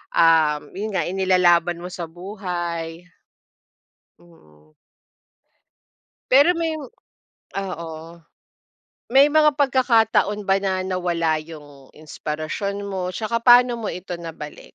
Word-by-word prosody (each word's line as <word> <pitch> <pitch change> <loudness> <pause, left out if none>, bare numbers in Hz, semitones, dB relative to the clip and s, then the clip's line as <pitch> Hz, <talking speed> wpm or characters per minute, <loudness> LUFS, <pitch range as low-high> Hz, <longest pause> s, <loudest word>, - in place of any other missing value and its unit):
um, 160 -3 +3
yun 210 +3 -4
nga - - +1
inilalaban 175 -2 +2
mo - - -5
sa 170 -2 -6
buhay. 175 -2 -5 1.2
Mm. 75 -3 -23 1.6
Pero 285 +6 +7
may 330 -1 -1 0.9
oo. 170 -4 -6 1.2
May 270 +3 +6
mga 305 0 +4
pagkakataon 225 -6 +2
ba 195 0 +3
na 190 -1 -1
nawala 175 -3 0
yung 145 -4 -14
inspirasyon 155 +6 -5
mo 190 -1 -3
'tsaka 220 +5 -3
paano 245 0 +7
mo 215 - -4
ito 180 0 -6
nabalik? 165 -3 -9
180 Hz, 100 wpm, -22 LUFS, 165-210 Hz, 1.6 s, Pero